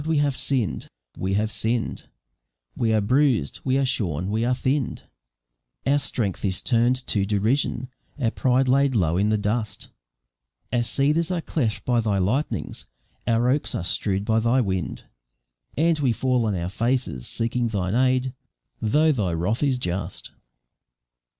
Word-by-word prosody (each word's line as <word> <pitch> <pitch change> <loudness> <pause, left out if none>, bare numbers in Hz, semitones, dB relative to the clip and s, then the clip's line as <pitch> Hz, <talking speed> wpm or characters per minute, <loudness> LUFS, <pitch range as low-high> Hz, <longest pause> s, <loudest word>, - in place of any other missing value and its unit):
we 160 -1 +2
have 145 -2 +2
sinn'd, 110 - -1 0.3
we 95 +1 -1
have 110 +1 0
sinn'd, 115 +2 -2 0.7
We 115 -1 +1
are 110 -1 +3
bruis'd, 125 - +2
we 130 0 +1
are 135 - +2
shorn, 90 - -1
we 110 +2 0
are 125 +1 +2
thinn'd, 130 +1 -1 0.8
Our 140 +2 +3
strength 105 -8 -2
is 95 0 -1
turn'd 120 +1 +3
to 100 - +1
derision, 115 +5 0 0.3
our 115 -4 +1
pride 130 +1 +2
laid 135 0 +3
low 85 -5 +2
in 100 +2 +2
the 110 - +2
dust, 105 0 -2 0.8
Our 120 - +3
cedars 145 +8 +1
are 180 -2 0
cleft 125 -9 -2
by 120 -1 +2
Thy 105 -3 +1
lightnings, 110 +11 -1 0.4
our 115 +1 +2
oaks 145 +2 -1
are - - -2
strew'd 100 +2 -1
by 110 0 +2
Thy 115 +3 +2
wind, 95 -7 -2 0.7
And 165 +1 +3
we 130 -5 +2
fall 125 -1 +1
on 105 - 0
our 85 0 -2
faces 115 - -1
seeking 115 +1 -1
Thine 95 -4 -1
aid, 130 +1 +2 0.5
though 150 +8 +3
Thy 105 - 0
wrath 90 +8 -1
is 140 -3 +2
just." 95 -5 -4
115 Hz, 155 wpm, -24 LUFS, 100-130 Hz, 0.8 s, are